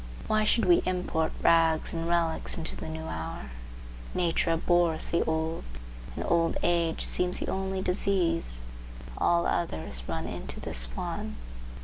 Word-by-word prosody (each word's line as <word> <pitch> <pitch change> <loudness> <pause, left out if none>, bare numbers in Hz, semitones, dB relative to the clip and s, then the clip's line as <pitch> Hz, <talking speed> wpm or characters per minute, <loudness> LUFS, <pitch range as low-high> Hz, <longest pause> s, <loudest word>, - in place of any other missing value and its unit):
Why 215 0 +2
should 225 0 +4
we 175 -1 +6
import 180 -3 0
rags 165 -1 +4
and 165 0 -2
relics 170 -1 +1
into 160 -2 -4
the - - -6
new 160 0 -5
hour? 80 - -5 0.6
Nature 170 -1 +2
abhors 170 -1 +2
the 170 - +3
old, 160 +1 -1 0.5
and - - -3
old 165 -1 +2
age 170 -2 +1
seems 180 0 0
the - - -2
only 190 0 -2
disease; 175 - 0 0.6
all 170 0 +3
others 80 - -1
run - - -2
into - - -5
this - - -2
one. - - -4
165 Hz, 140 wpm, -29 LUFS, 160-180 Hz, 0.6 s, we